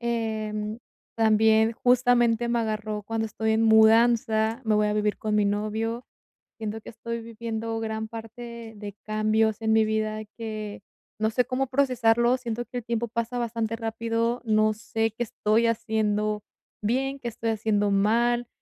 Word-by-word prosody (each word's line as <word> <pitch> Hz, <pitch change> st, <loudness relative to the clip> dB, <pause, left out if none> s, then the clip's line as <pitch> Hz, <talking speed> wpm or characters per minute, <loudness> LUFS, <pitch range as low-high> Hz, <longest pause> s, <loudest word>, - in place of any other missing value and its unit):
em, 220 Hz, -2 st, -2 dB, 0.4 s
también 220 Hz, 0 st, +4 dB
justamente 240 Hz, -1 st, +3 dB
me 235 Hz, 0 st, +1 dB
agarró 215 Hz, -1 st, -3 dB
cuando 225 Hz, +1 st, -2 dB
estoy 220 Hz, +1 st, -1 dB
en 220 Hz, +1 st, +2 dB
mudanza. 225 Hz, +1 st, +4 dB
Me 220 Hz, -, +2 dB
voy 210 Hz, 0 st, +3 dB
a 210 Hz, -, 0 dB
vivir 210 Hz, 0 st, 0 dB
con 215 Hz, -1 st, -2 dB
mi 210 Hz, -1 st, +3 dB
novio. 220 Hz, +3 st, -2 dB, 0.5 s
Siento 220 Hz, 0 st, -5 dB
que -, -, -9 dB
estoy 230 Hz, 0 st, -5 dB
viviendo 225 Hz, 0 st, -4 dB
gran 220 Hz, 0 st, -3 dB
parte 230 Hz, 0 st, -9 dB
de 205 Hz, -1 st, -7 dB
cambios 215 Hz, 0 st, +1 dB
en 220 Hz, 0 st, +2 dB
mi 220 Hz, 0 st, +4 dB
vida 215 Hz, 0 st, -1 dB
que 215 Hz, -3 st, -6 dB, 0.4 s
no 220 Hz, 0 st, +1 dB
sé 245 Hz, +2 st, +2 dB
cómo 260 Hz, +2 st, -1 dB
procesarlos, 250 Hz, -2 st, +2 dB
siento 240 Hz, -1 st, -3 dB
que 245 Hz, -, -6 dB
el 240 Hz, -, -7 dB
tiempo 235 Hz, 0 st, -1 dB
pasa 235 Hz, +2 st, -3 dB
bastante 230 Hz, -1 st, -2 dB
rápido, 230 Hz, +1 st, -1 dB
no 215 Hz, -1 st, +3 dB
sé 225 Hz, +1 st, -2 dB
qué 230 Hz, -, -4 dB
estoy 225 Hz, 0 st, +1 dB
haciendo 215 Hz, -2 st, 0 dB, 0.4 s
bien, 270 Hz, +5 st, -1 dB
qué 240 Hz, -, -4 dB
estoy 230 Hz, 0 st, -3 dB
haciendo 210 Hz, -2 st, +1 dB
mal, 235 Hz, +4 st, +2 dB
225 Hz, 160 wpm, -26 LUFS, 215-235 Hz, 0.5 s, también